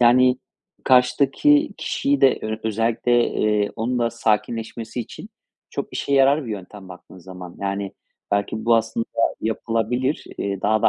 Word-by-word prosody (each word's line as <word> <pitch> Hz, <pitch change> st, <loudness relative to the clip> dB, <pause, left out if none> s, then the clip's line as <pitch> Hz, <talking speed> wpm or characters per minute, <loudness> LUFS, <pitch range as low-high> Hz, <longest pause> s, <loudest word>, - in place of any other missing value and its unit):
Yani, 125 Hz, +1 st, +5 dB, 0.5 s
karşıdaki 135 Hz, -, +4 dB
kişiyi 285 Hz, +1 st, 0 dB
de 135 Hz, -, +5 dB
ö 110 Hz, 0 st, -2 dB
özellikle, 115 Hz, +2 st, +1 dB
eee, 105 Hz, -1 st, +1 dB
onun 120 Hz, +2 st, -1 dB
da 115 Hz, -1 st, +1 dB
sakinleşmesi 115 Hz, +1 st, -2 dB
için 115 Hz, -, -9 dB, 0.4 s
çok -, -, -4 dB
işe 140 Hz, -, -3 dB
yarar 140 Hz, +2 st, +4 dB
bir -, -, -5 dB
yöntem 100 Hz, -1 st, -8 dB
baktığın 90 Hz, 0 st, -13 dB
zaman. 90 Hz, 0 st, -10 dB
Yani, 100 Hz, 0 st, -3 dB, 0.4 s
belki 100 Hz, +2 st, -1 dB
bu 115 Hz, 0 st, +5 dB
aslında 115 Hz, 0 st, -1 dB, 0.3 s
yapılabilir. 115 Hz, +5 st, -1 dB
Eee, 100 Hz, -1 st, -2 dB
daha 110 Hz, +1 st, +2 dB
da -, -, +6 dB
115 Hz, 145 wpm, -22 LUFS, 105-125 Hz, 0.5 s, da